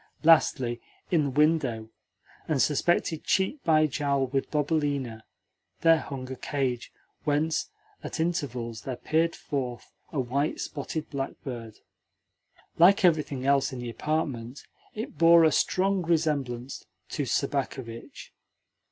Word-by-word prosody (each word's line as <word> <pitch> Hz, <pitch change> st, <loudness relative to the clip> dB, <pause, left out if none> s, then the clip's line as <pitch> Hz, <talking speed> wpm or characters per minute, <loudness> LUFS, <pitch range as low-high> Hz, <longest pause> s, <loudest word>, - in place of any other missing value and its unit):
Lastly, 130 Hz, -7 st, +4 dB, 0.3 s
in 160 Hz, -4 st, +3 dB
the -, -, 0 dB
window, 135 Hz, -6 st, +1 dB, 0.6 s
and 150 Hz, -3 st, 0 dB
suspended 160 Hz, +2 st, +1 dB
cheek 195 Hz, +10 st, 0 dB
by 155 Hz, -2 st, +4 dB
jowl 140 Hz, -2 st, 0 dB
with 135 Hz, +1 st, -2 dB
Bobelina, 145 Hz, -6 st, -1 dB, 0.6 s
there 165 Hz, -1 st, +6 dB
hung 130 Hz, -3 st, -6 dB
a -, -, -4 dB
cage 130 Hz, -3 st, -2 dB, 0.3 s
whence 150 Hz, +2 st, 0 dB, 0.3 s
at -, -, -5 dB
intervals 125 Hz, -9 st, -2 dB
there 130 Hz, -, -4 dB
peered 165 Hz, +6 st, 0 dB
forth 125 Hz, -5 st, -5 dB, 0.2 s
a 150 Hz, -, -2 dB
white 135 Hz, +4 st, -1 dB
spotted 155 Hz, +1 st, -4 dB
blackbird. 130 Hz, -5 st, -6 dB, 1.0 s
Like 195 Hz, +4 st, +6 dB
everything 150 Hz, -6 st, +1 dB
else 140 Hz, 0 st, +3 dB
in 130 Hz, -, -6 dB
the 120 Hz, -1 st, -5 dB
apartment, 135 Hz, -4 st, -3 dB, 0.3 s
it 220 Hz, +2 st, -6 dB
bore 170 Hz, 0 st, +7 dB
a 160 Hz, -, +5 dB
strong 190 Hz, +6 st, +1 dB
resemblance 145 Hz, -7 st, -1 dB, 0.3 s
to 145 Hz, -, -2 dB
Sobakevitch. 130 Hz, -4 st, -3 dB
145 Hz, 120 wpm, -27 LUFS, 130-160 Hz, 1.0 s, bore